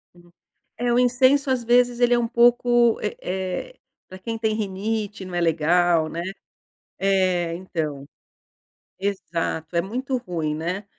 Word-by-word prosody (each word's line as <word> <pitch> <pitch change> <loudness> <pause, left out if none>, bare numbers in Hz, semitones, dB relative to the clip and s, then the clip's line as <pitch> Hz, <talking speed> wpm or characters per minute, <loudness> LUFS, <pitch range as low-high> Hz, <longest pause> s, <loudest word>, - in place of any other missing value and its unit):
Sim. 175 0 -20 0.5
É, 240 0 0
o 245 - +3
incenso, 260 +3 +3
às 255 -2 0
vezes, 245 +1 +3
ele 245 0 +4
é 240 - +3
um 230 - 0
pouco, 240 0 +4
eh 210 - -3
eh, 190 - -4 0.3
pra 185 0 -11
quem 225 +3 -4
tem 220 -1 0
rinite 210 0 -3
não 185 -1 -7
é 175 - 0
legal 165 0 +2
né. 170 +2 -4 0.8
É, 185 -3 +1
então. 155 -6 -4 0.9
Exato, 170 -4 -3
é 170 - +3
muito 255 +7 -3
ruim, 165 -8 -3
né. 180 +6 -4
195 Hz, 150 wpm, -23 LUFS, 175-240 Hz, 0.9 s, ele